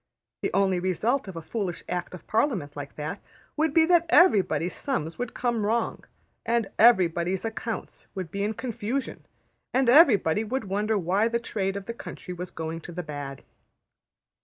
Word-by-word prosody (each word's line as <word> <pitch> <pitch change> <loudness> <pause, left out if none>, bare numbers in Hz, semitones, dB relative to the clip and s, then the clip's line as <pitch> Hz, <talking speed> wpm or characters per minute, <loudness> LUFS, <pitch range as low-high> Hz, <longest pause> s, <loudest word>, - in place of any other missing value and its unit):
The - - 0
only 190 -2 +2
result 210 - 0
of 190 - -7
a 165 - -6
foolish 190 -1 -3
Act 180 0 -3
of 180 - -13
Parliament 210 - 0
like 140 -1 -7
that 150 +1 -5 0.3
would 315 0 +1
be 320 +2 +5
that 340 0 +4
everybody's 205 - +4
sums 170 - -3
would 245 -1 -4
come 240 -3 0
wrong, 225 +3 -1 0.4
and 230 -4 0
everybody's 185 -4 +4
accounts 225 0 -5 0.2
be 200 +2 -2
in 215 +2 -1
confusion, 245 +2 -4 0.5
and 260 -1 +3
everybody 225 - +6
would 255 +4 -2
wonder 210 +2 0
why 195 +4 +2
the 235 0 0
trade 195 -4 -2
of 200 - -7
the 235 - -4
country 180 -5 -8
was 180 0 -6
going 160 +1 -5
to 175 - -9
the 175 +1 -5
bad. 145 -3 -7
205 Hz, 165 wpm, -26 LUFS, 175-235 Hz, 0.5 s, everybody